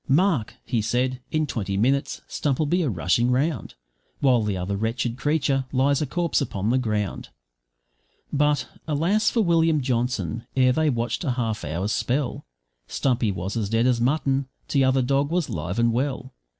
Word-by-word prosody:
`Mark,' 150 Hz, -, +2 dB
he 115 Hz, -3 st, 0 dB
said, 125 Hz, +4 st, 0 dB
`in 155 Hz, -1 st, +1 dB
twenty 100 Hz, -6 st, -2 dB
minutes 135 Hz, +6 st, 0 dB
Stump'll 145 Hz, +1 st, 0 dB
be 175 Hz, +5 st, +1 dB
a 155 Hz, -, +1 dB
rushing 105 Hz, +5 st, +1 dB
round, 135 Hz, +2 st, 0 dB, 0.4 s
While 130 Hz, -4 st, +4 dB
the 105 Hz, -3 st, -1 dB
other 90 Hz, +2 st, -2 dB
wretched 115 Hz, +3 st, -1 dB
creature 140 Hz, -1 st, 0 dB
lies 135 Hz, +2 st, +2 dB
a 150 Hz, -, -1 dB
corpse 170 Hz, +2 st, 0 dB
upon 105 Hz, -5 st, -1 dB
the 130 Hz, -, +3 dB
ground.' 105 Hz, -5 st, -2 dB, 1.0 s
But, 145 Hz, -3 st, +2 dB, 0.2 s
alas 170 Hz, +9 st, +2 dB
for 230 Hz, -, +1 dB
William 165 Hz, -4 st, +3 dB
Johnson! 120 Hz, -, -1 dB
ere 130 Hz, -1 st, +4 dB
they'd 155 Hz, -2 st, +1 dB
watched 120 Hz, +4 st, -2 dB
a 150 Hz, -, -1 dB
half 110 Hz, -3 st, -2 dB
hour's 85 Hz, +8 st, -2 dB
spell 125 Hz, -, -1 dB, 0.4 s
Stumpy 120 Hz, -5 st, 0 dB
was 95 Hz, +3 st, -4 dB
as 110 Hz, -4 st, -1 dB
dead 115 Hz, +2 st, +2 dB
as 125 Hz, -2 st, +2 dB
mutton, 135 Hz, 0 st, +1 dB, 0.2 s
t'other 130 Hz, -2 st, +3 dB
dog 140 Hz, +2 st, +1 dB
was 175 Hz, -2 st, -1 dB
live 90 Hz, +5 st, -3 dB
and 115 Hz, 0 st, +3 dB
well. 130 Hz, +1 st, -2 dB
130 Hz, 165 wpm, -24 LUFS, 115-145 Hz, 1.0 s, While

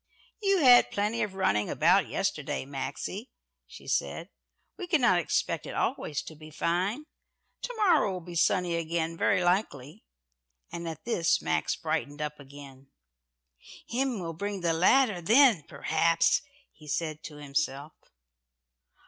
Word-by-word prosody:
"You 395 Hz, -3 st, +2 dB
had 250 Hz, -3 st, +7 dB
plenty 210 Hz, +3 st, -1 dB
of 195 Hz, -2 st, -3 dB
running 105 Hz, -, +1 dB
about 190 Hz, +3 st, +3 dB
yesterday, 195 Hz, -9 st, -2 dB
Maxie," 140 Hz, -, -5 dB, 0.4 s
she -, -, -13 dB
said. -, -, -2 dB, 0.5 s
"We 365 Hz, -, -7 dB
cannot 250 Hz, -, +3 dB
expect 170 Hz, -, -1 dB
it -, -, -7 dB
always 145 Hz, -, -2 dB
to 160 Hz, -, -10 dB
be 155 Hz, +1 st, -13 dB
fine. 185 Hz, -, -1 dB, 0.6 s
To -, -, -5 dB
morrow 360 Hz, -, +3 dB
will 185 Hz, -, -4 dB
be 175 Hz, +1 st, -10 dB
sunny 175 Hz, 0 st, +1 dB
again 165 Hz, 0 st, -2 dB
very 180 Hz, +2 st, +1 dB
likely," 175 Hz, -2 st, -1 dB, 0.7 s
and 170 Hz, 0 st, -6 dB
at 160 Hz, -, -9 dB
this 175 Hz, -8 st, +1 dB
Max -, -, -1 dB
brightened 145 Hz, +1 st, -3 dB
up 150 Hz, 0 st, -4 dB
again. 140 Hz, -1 st, -13 dB, 1.0 s
"Him 250 Hz, -2 st, -1 dB
will 165 Hz, -2 st, -5 dB
bring 200 Hz, +3 st, -4 dB
the 170 Hz, -1 st, +1 dB
ladder 195 Hz, +3 st, +3 dB
then, 225 Hz, -, +5 dB
perhaps," 165 Hz, 0 st, +2 dB, 0.3 s
he 155 Hz, -, -17 dB
said 155 Hz, +1 st, -3 dB
to 150 Hz, -, -8 dB
himself. 145 Hz, 0 st, -3 dB
170 Hz, 140 wpm, -28 LUFS, 150-210 Hz, 1.0 s, had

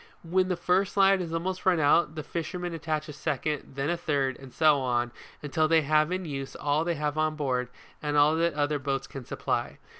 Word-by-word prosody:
When 185 Hz, +2 st, +1 dB
the 185 Hz, -, 0 dB
first 180 Hz, +3 st, +1 dB
line 195 Hz, 0 st, +5 dB
has 170 Hz, -3 st, -4 dB
almost 180 Hz, +3 st, -2 dB
run 185 Hz, -3 st, +3 dB
out, 155 Hz, +1 st, +3 dB
the 155 Hz, -, -4 dB
fisherman 175 Hz, +2 st, -4 dB
attach 155 Hz, -1 st, -3 dB
a 150 Hz, -, -7 dB
second, 150 Hz, 0 st, -3 dB
then 140 Hz, +4 st, -1 dB
a -, -, +1 dB
third, 140 Hz, -6 st, 0 dB
and 135 Hz, -1 st, -12 dB
so 155 Hz, -1 st, +4 dB
on 120 Hz, -1 st, 0 dB, 0.4 s
till 155 Hz, +2 st, +3 dB
they 160 Hz, -1 st, +4 dB
have 155 Hz, +2 st, +3 dB
in 185 Hz, 0 st, -2 dB
use 135 Hz, -3 st, -5 dB
all 150 Hz, +2 st, 0 dB
they 170 Hz, 0 st, -1 dB
have 150 Hz, 0 st, -2 dB
on 155 Hz, 0 st, +1 dB
board, 130 Hz, -4 st, -1 dB, 0.3 s
and 150 Hz, -1 st, -1 dB
all 150 Hz, +2 st, +5 dB
that 170 Hz, -1 st, +1 dB
the -, -, -5 dB
other 145 Hz, 0 st, +1 dB
boats 135 Hz, 0 st, -2 dB
can 135 Hz, -3 st, -9 dB
supply. -, -, -2 dB
155 Hz, 220 wpm, -28 LUFS, 145-170 Hz, 0.4 s, line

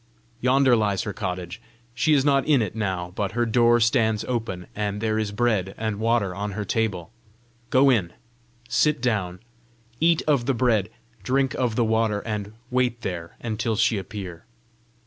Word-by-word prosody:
Yonder 130 Hz, +1 st, +4 dB
lies 105 Hz, -4 st, 0 dB
her 105 Hz, -, -4 dB
cottage. 90 Hz, -3 st, -5 dB, 0.3 s
She 155 Hz, +5 st, +3 dB
is 135 Hz, -1 st, +2 dB
not 140 Hz, -2 st, +3 dB
in 140 Hz, -6 st, +4 dB
it 105 Hz, -, -5 dB
now, 95 Hz, -5 st, -2 dB
but 100 Hz, 0 st, -2 dB
her 120 Hz, +1 st, +1 dB
door 120 Hz, +1 st, +4 dB
stands 110 Hz, -2 st, +2 dB
open, 115 Hz, -7 st, -3 dB
and 105 Hz, -1 st, -2 dB
there 110 Hz, 0 st, 0 dB
is 105 Hz, -2 st, -2 dB
bread 105 Hz, -4 st, 0 dB
and 110 Hz, -2 st, -3 dB
water 115 Hz, -4 st, +1 dB
on 100 Hz, +2 st, -4 dB
her 105 Hz, +1 st, -4 dB
table. 105 Hz, -4 st, -1 dB, 0.6 s
Go 135 Hz, +2 st, +5 dB
in; 95 Hz, -9 st, +1 dB, 0.6 s
sit 150 Hz, +4 st, +2 dB
down; 105 Hz, -7 st, -1 dB, 0.6 s
eat 165 Hz, 0 st, +3 dB
of 140 Hz, -5 st, +1 dB
the 135 Hz, -, +2 dB
bread; 110 Hz, -5 st, +2 dB, 0.3 s
drink 135 Hz, 0 st, +1 dB
of 120 Hz, -4 st, -1 dB
the 120 Hz, -, +2 dB
water; 110 Hz, -2 st, +1 dB
and 105 Hz, -2 st, -4 dB, 0.2 s
wait 125 Hz, -2 st, 0 dB
there 85 Hz, -5 st, -5 dB
until 110 Hz, 0 st, -2 dB
she 115 Hz, -1 st, +2 dB
appear. 95 Hz, -4 st, -8 dB
110 Hz, 165 wpm, -24 LUFS, 100-120 Hz, 0.6 s, Go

